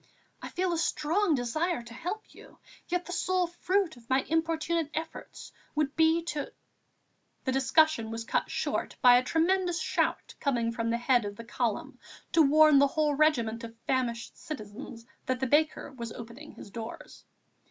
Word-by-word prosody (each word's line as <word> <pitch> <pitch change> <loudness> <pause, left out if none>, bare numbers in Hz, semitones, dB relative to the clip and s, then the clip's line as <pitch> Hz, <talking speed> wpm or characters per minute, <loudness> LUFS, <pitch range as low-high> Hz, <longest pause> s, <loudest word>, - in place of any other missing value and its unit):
I - - -6
feel 365 -1 -1
a 335 - -1
strong 330 +3 +1
desire 275 +4 -1
to 235 0 -11
help 360 - -6
you; - - -16 0.3
yet 360 0 -1
the - - -7
sole 365 +1 +1
fruit 350 0 0
of 230 -1 -18
my 260 0 +3
importunate 325 0 0
efforts 320 +1 -6 0.2
would 300 -1 0
be 320 +1 +4
to...." 300 -4 -4 0.9
The 260 - 0
discussion 270 -2 +3
was 225 0 -4
cut - - -1
short - - -2
by 245 -1 +9
a 250 - +2
tremendous 345 +4 +1
shout - - -1
coming 240 -5 0
from 230 0 -2
the 230 - +1
head 245 0 +3
of 205 0 -5
the 230 - -9
column 230 -2 -3 0.3
to 330 - +5
warn 305 0 +6
the 280 - +6
whole 300 +1 +1
regiment 245 -7 +2
of 230 0 -9
famished 240 -3 -1
citizens 230 -3 -8 0.2
that 255 -1 0
the 265 - 0
baker 295 +2 +1
was 235 -3 -7
opening 240 +6 -10
his 200 - -12
doors. 225 +2 -8
285 Hz, 170 wpm, -29 LUFS, 235-325 Hz, 0.9 s, by